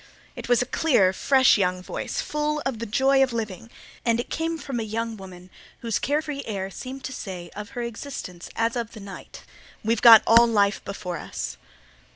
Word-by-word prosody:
It - - -8
was 245 0 +4
a - - -7
clear, 240 -10 +3
fresh 260 +2 +4
young 180 -1 0
voice, - - -4
full 300 0 -1
of 265 -5 -2
the 230 - -4
joy 270 +5 +3
of 260 -2 +2
living 225 -1 -5 0.3
and 235 0 +1
came 325 +1 -1
from 275 -5 -4
a - - -2
young 225 +1 -3
woman 185 -2 -12 0.3
whose 230 -3 -1
carefree 295 0 -1
air 195 -3 -4
seemed 265 +5 -8
to 260 - -5
say 180 -7 -7
of 210 +5 -8
her 240 - -1
existence 230 -7 -7
as 230 +1 0
of 230 -2 -4
the 220 - -9
night 195 -2 -10 0.4
"We've 225 0 0
got 230 -2 +10
all 235 +1 +7
life 205 -3 +2
before 190 -3 -5
us." - - -5
230 Hz, 190 wpm, -25 LUFS, 200-260 Hz, 0.4 s, got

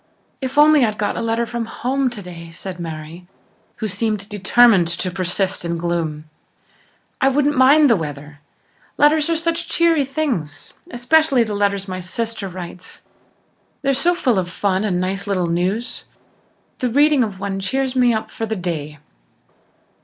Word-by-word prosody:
"If 265 +2 -4
only 300 -1 +6
I'd 215 -2 0
got 205 - -1
a - - -3
letter 230 +1 0
from 235 0 -4
home 260 +3 -1
today," 180 -7 -9
said 180 +1 -8
Mary, 165 +1 -7 0.5
who 220 - -3
seemed 210 0 -2
determined 205 -2 +4
to 180 +2 -3
persist 185 +1 -1
in 170 0 -2
gloom. 165 -3 -3 0.9
"I 270 - +4
wouldn't 290 +2 +2
mind 280 +4 +6
the 230 - +5
weather. 145 -3 -6 0.6
Letters 300 +2 +4
are 330 - +2
such 330 +1 -1
cheery 335 -3 +3
things: 265 - -3 0.2
especially 275 0 +3
the 215 -2 -4
letters 200 -1 0
my 185 -1 -4
sister 215 +2 -4
writes. 180 0 -9 0.8
They're 275 0 +2
so 340 +7 +2
full 250 - +1
of 180 -1 -3
fun 190 +1 -1
and 185 -4 0
nice 195 +2 -3
little 190 -3 0
news. 180 +8 -2 0.7
The 250 - 0
reading 290 +2 +4
of 205 -4 -5
one 195 -1 -3
cheers 265 +7 -2
me 250 -2 +4
up 220 -1 -3
for 225 - -4
the 220 - -2
day. 160 -5 -4
210 Hz, 160 wpm, -20 LUFS, 180-260 Hz, 0.9 s, only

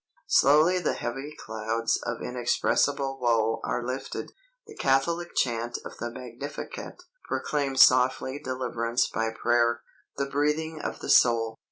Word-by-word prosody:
Slowly 155 +6 +5
the 175 - -1
heavy 135 +5 -5
clouds 110 +1 -2
of 120 - -4
inexpressible 135 +2 0
woe 115 -2 +2
are 125 -1 -2
lifted. 130 +2 -5 0.3
The 435 - -12
Catholic 170 - 0
chant 120 -1 0
of - - -9
the 120 - -3
Magnificat 130 - -8 0.2
proclaims 140 -3 +3
softly 130 +2 +1
deliverance 125 -2 -1
by 115 0 -1
prayer, 120 +1 +1 0.3
"the 140 - 0
breathing 150 +3 -1
of - - -5
the - - -6
soul." 115 -2 +4
125 Hz, 130 wpm, -27 LUFS, 115-140 Hz, 0.3 s, Slowly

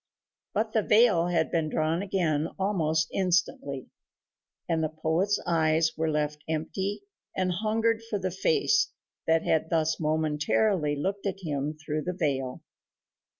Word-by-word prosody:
But 220 +1 0
the 220 - +3
veil 210 -6 +4
had 165 -2 +1
been 160 -2 0
drawn 160 +3 0
again 165 -6 0
almost 160 -5 +1
instantly, 175 -7 0 0.8
and 165 -2 +1
the 155 - 0
poet's 160 +6 0
eyes 160 -1 +2
were 160 0 0
left 150 -1 -1
empty 190 +6 -2 0.3
and 185 -1 +1
hungered 220 +4 +1
for 210 - 0
the 185 -1 -2
face 430 - +2 0.4
that 160 0 +3
had 160 0 +1
thus 160 -1 +1
momentarily 155 +2 +1
looked 195 +7 -2
at 195 0 -4
him 150 -1 -2
through 155 0 -3
the 180 +4 -3
veil. 135 -7 -2
165 Hz, 140 wpm, -28 LUFS, 155-195 Hz, 0.8 s, veil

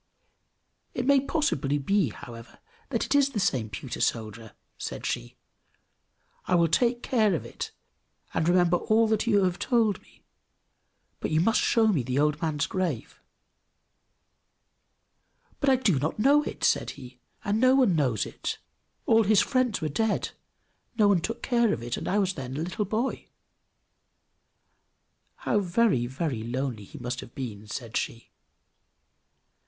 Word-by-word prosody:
"It - - -2
may 280 0 +5
possibly 170 - 0
be, 185 - +1
however, 115 +2 -11 0.3
that - - -1
it - - -1
is 285 -1 +4
the 245 -6 -3
same 125 - 0
pewter 100 - -6
soldier!" 110 -1 -2 0.3
said - - -5
she. - - -4 1.1
"I 180 - +3
will 170 -1 +3
take 240 +7 +1
care 215 -7 +2
of - - -4
it, - - -6 0.6
and 160 - +1
remember 175 -1 +4
all 220 +5 +2
that 220 +1 0
you 205 -4 +4
have 180 -1 0
told 225 -5 +1
me; - - -25 1.0
but - - -3
you 155 - +2
must 220 +7 +3
show 230 -1 +3
me 175 -10 +2
the 125 +2 -3
old 150 +1 +1
man's 155 -3 0
grave!" 185 -2 -3 2.4
"But 280 - +2
I 265 - +6
do 205 - +2
not 155 +4 -2
know 280 +7 +5
it," - - -7
said - - +2
he, 125 -2 -12 0.3
"and 205 +2 +1
no 255 +2 +5
one 250 -10 +4
knows 130 -9 +1
it! - - -5 0.5
All 225 0 +5
his 210 -1 +4
friends 250 -2 0
were 155 - 0
dead, 220 +9 -1 0.7
no 210 -2 +5
one 190 -4 +3
took 230 +7 -4
care 235 -3 +2
of 115 - -4
it, 120 0 -2
and - - -6
I 200 - +1
was 190 -2 +1
then 130 -3 -6
a - - -2
little 185 +4 -2
boy!" 225 +6 -2 2.1
"How 210 - 0
very, 185 - +2
very 130 -2 -3
lonely 120 -2 -3
he 150 - -12
must 125 -1 -4
have - - -11
been!" 110 -6 -6
said 115 +1 -6
she. 115 - -3
175 Hz, 160 wpm, -27 LUFS, -, 2.4 s, I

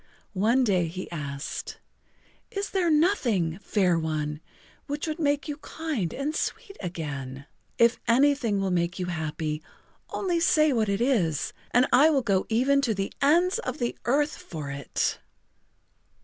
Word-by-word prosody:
One 225 +7 +3
day 185 -7 +2
he 180 +3 -7
asked: 140 -3 -5 0.7
"Is 400 +1 -4
there 365 -3 +1
nothing, 240 - +2
Fair 185 -5 +2
One, 155 -1 -2 0.5
would 305 +3 -3
make 290 -1 +1
you 295 -1 -4
kind 310 - -3
and 290 +3 -3
sweet 395 - -3
again? 140 -6 -5 0.3
If 235 0 +4
anything 245 -4 +3
will 195 -1 0
make 175 0 0
you 180 - -2
happy, 155 -2 -3 0.5
only 355 -3 0
say 310 -3 +4
what 220 -4 +1
it 200 +2 0
is 190 - +1 0.2
and 245 +2 +4
I 290 +5 +7
will 280 -4 +2
go 195 -4 +1
even 265 +5 +3
to 235 -6 0
the 195 0 -3
ends 345 +8 +4
of 475 - -4
the 240 -3 -2
earth 290 +4 +1
for 150 -4 -7
it." 140 0 -2
225 Hz, 150 wpm, -27 LUFS, -, 0.7 s, I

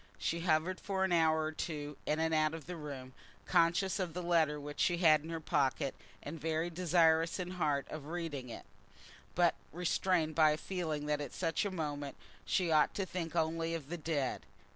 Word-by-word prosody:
She 170 - -1
hovered 170 +2 +1
for 190 -1 -1
an 190 - +1
hour 160 -2 +4
or 155 - -1
two 150 -2 -4
in 155 - +1
and 160 0 +1
out 155 0 +2
of 160 -4 -9
the 180 - -6
room, 140 -5 -7 0.3
conscious 180 +4 +3
of 175 -3 -2
the 180 - -3
letter 160 -4 +2
which 145 0 -8
she 175 - +3
had 155 -3 +5
in 160 - -9
her 165 -1 -3
pocket, 140 -2 0 0.3
and 150 +1 -7
very 160 +2 -1
desirous 165 -1 +3
in 180 -1 -4
heart 150 -6 0
of 150 -2 -7
reading 160 -6 -4
it, 115 - -8 0.7
but 175 -2 +4 0.2
restrained 175 -1 +1
by 155 -1 +5
a - - -2
feeling 160 -5 -3
that 150 0 0
at 145 - -6
such 165 +3 0
a - - 0
moment 145 -5 -4 0.3
she 180 -3 +1
ought 155 -1 +4
to 195 - -1
think 175 -3 -4
only 165 0 0
of 150 -4 -7
the 175 - -3
dead. 150 -5 -2
160 Hz, 200 wpm, -34 LUFS, 150-175 Hz, 0.7 s, had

